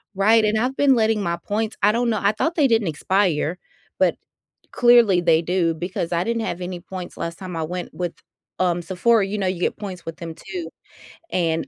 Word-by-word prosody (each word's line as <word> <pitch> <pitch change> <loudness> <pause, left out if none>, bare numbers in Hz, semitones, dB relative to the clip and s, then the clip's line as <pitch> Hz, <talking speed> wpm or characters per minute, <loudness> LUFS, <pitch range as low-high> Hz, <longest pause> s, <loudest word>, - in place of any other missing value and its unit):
Right, 215 +3 +4
and 215 +1 +1
I've 255 +4 -1
been 275 -2 +5
letting 220 -2 +2
my 170 -2 -1
points 215 +4 -3
I 210 - +6
don't 235 +2 0
know, 215 - 0
I 200 +1 +3
thought 325 +10 -1
they 290 -5 +4
didn't 225 -5 +2
expire, 175 0 0 0.4
but - - +3 0.6
clearly 240 -6 +5
they 165 -2 +4
do 170 -1 +1
because 175 +1 -4
I 170 +1 +1
didn't 230 +1 -1
have 180 - -4
any 180 0 -5
points 185 0 -8
last 170 0 -4
time 185 -3 -7
I 160 - -1
went 175 +2 -5
with, 175 -2 -3 0.5
um, 175 -1 +1
Sephora. 195 +4 +2
You 210 +2 -3
know, 195 - -1
you 185 -1 -2
get - - -1
points 190 -4 -7
with 165 0 -6
them 165 -2 -7
too, 355 - -7 0.6
and 165 -2 0
190 Hz, 210 wpm, -22 LUFS, 175-220 Hz, 0.6 s, I